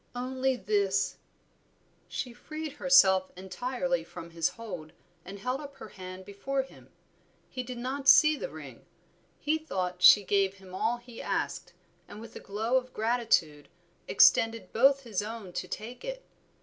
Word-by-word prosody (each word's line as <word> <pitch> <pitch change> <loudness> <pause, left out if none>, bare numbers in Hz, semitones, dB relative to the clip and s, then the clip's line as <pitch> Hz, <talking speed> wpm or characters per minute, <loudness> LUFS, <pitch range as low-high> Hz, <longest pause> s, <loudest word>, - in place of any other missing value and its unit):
"Only 260 +1 -1
this." 200 -4 0 0.9
She 250 -3 -5
freed 310 +5 -7
herself 190 -10 +5
entirely 250 +8 -2
from 170 0 -10
his 165 -1 +1
hold 180 -9 -8 0.3
and 195 +2 -9
held 255 +7 -3
up 285 -1 -10
her 245 - -10
hand 185 -1 -9
before 265 +8 -2
him. 265 - -17 0.6
He 255 - -3
did 250 0 -7
not 265 +3 -4
see 305 +2 +8
the - - -5
ring; - - -11 0.5
he 310 +2 0
thought 180 - -3
she 205 +2 +9
gave 195 0 +1
him 190 -1 -15
all 230 +5 0
he 240 -1 -11
asked, - - -3 0.3
and 210 - -10
with 225 0 -11
a - - -6
glow 220 +5 0
of 255 -1 -4
gratitude 220 -10 +1 0.4
extended 225 -4 +4
both 275 +4 +4
his 220 -6 -2
own 210 -3 -7
to - - -4
take 235 +4 -7
it. - - -6
230 Hz, 155 wpm, -29 LUFS, 190-260 Hz, 0.9 s, she